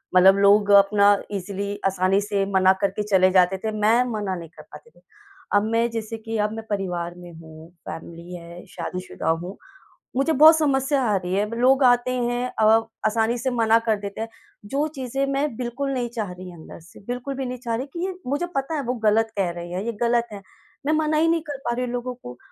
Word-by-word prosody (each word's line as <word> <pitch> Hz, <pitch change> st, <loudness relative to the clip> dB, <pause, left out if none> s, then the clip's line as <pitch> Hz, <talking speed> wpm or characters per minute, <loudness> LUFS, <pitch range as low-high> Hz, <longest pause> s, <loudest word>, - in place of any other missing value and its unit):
मतलब 190 Hz, +2 st, +7 dB
लोग 205 Hz, +1 st, +5 dB
अपना 205 Hz, 0 st, +4 dB, 0.2 s
ईज़िली 200 Hz, +1 st, -4 dB
आसानी 190 Hz, +1 st, +1 dB
से 200 Hz, -1 st, -1 dB
मना 190 Hz, 0 st, +5 dB
करके 200 Hz, +1 st, 0 dB
चले 190 Hz, -2 st, +4 dB
जाते 185 Hz, 0 st, +4 dB
थे, 220 Hz, +2 st, -3 dB
मैं 215 Hz, +3 st, +3 dB
मना 205 Hz, -4 st, -2 dB
नहीं 170 Hz, -2 st, -8 dB
कर -, -, -15 dB
पाती 470 Hz, -, -15 dB
थी। -, -, -26 dB, 0.5 s
अब 205 Hz, -, +4 dB
मैं 230 Hz, +1 st, +2 dB
जैसे 225 Hz, 0 st, -4 dB
कि 225 Hz, 0 st, -5 dB
अब 210 Hz, 0 st, 0 dB
मैं 225 Hz, 0 st, -7 dB
परिवार 175 Hz, -4 st, -3 dB
में 175 Hz, -1 st, -11 dB
हूँ, 160 Hz, 0 st, -13 dB, 0.2 s
फ़ैमिली 170 Hz, +2 st, -8 dB
है, 170 Hz, 0 st, -10 dB
शादीशुदा 180 Hz, -3 st, -5 dB
हूँ, 175 Hz, +4 st, -2 dB, 0.6 s
मुझे 275 Hz, +5 st, +2 dB
बहुत 315 Hz, +3 st, +8 dB
समस्या 275 Hz, -2 st, +1 dB
आ 215 Hz, -3 st, +1 dB
रही 180 Hz, 0 st, -4 dB
है, 205 Hz, +2 st, 0 dB
लोग 265 Hz, +2 st, +4 dB
आते 245 Hz, 0 st, +4 dB
हैं 245 Hz, 0 st, -1 dB, 0.2 s
अ, -, -, +5 dB, 0.4 s
आसानी 225 Hz, +2 st, +1 dB
से 260 Hz, -, -1 dB
मना 225 Hz, -1 st, +3 dB
कर 220 Hz, -, +2 dB
देते 200 Hz, +2 st, -6 dB
हैं, 225 Hz, -, -3 dB, 0.4 s
जो 280 Hz, +8 st, -1 dB
चीज़ें 270 Hz, +1 st, -2 dB
मैं 275 Hz, -2 st, -1 dB
बिल्कुल 255 Hz, +3 st, -3 dB
नहीं 245 Hz, -2 st, -2 dB
चाह 215 Hz, -6 st, -4 dB
रही 180 Hz, 0 st, -9 dB
अंदर 165 Hz, 0 st, -12 dB
से, 165 Hz, +1 st, -17 dB
बिल्कुल 250 Hz, +3 st, -4 dB
भी 265 Hz, 0 st, -3 dB
नहीं 250 Hz, 0 st, -4 dB
चाह 235 Hz, -2 st, -2 dB
रही 250 Hz, +4 st, -3 dB
कि 345 Hz, +1 st, -3 dB
ये 380 Hz, -, -3 dB
मुझे 290 Hz, +6 st, -1 dB
पता 275 Hz, +4 st, -1 dB
है, 290 Hz, -, -1 dB
वो 250 Hz, 0 st, -1 dB
गलत 220 Hz, +1 st, +3 dB
कह 190 Hz, -3 st, +1 dB
रहे 175 Hz, 0 st, -8 dB
हैं, 185 Hz, +2 st, -3 dB
ये 235 Hz, -, -1 dB
गलत 235 Hz, 0 st, +2 dB
है। 200 Hz, -, -8 dB, 0.4 s
मैं 305 Hz, -, +2 dB
मना 310 Hz, 0 st, +1 dB
ही 320 Hz, +2 st, +3 dB
नहीं 330 Hz, 0 st, +2 dB
कर 290 Hz, -2 st, -4 dB
पा 240 Hz, -, 0 dB
रही 250 Hz, +1 st, -1 dB
हूँ 245 Hz, -, -5 dB
लोगों 245 Hz, +1 st, -3 dB
को 125 Hz, -, -11 dB
220 Hz, 220 wpm, -23 LUFS, 190-250 Hz, 0.6 s, बहुत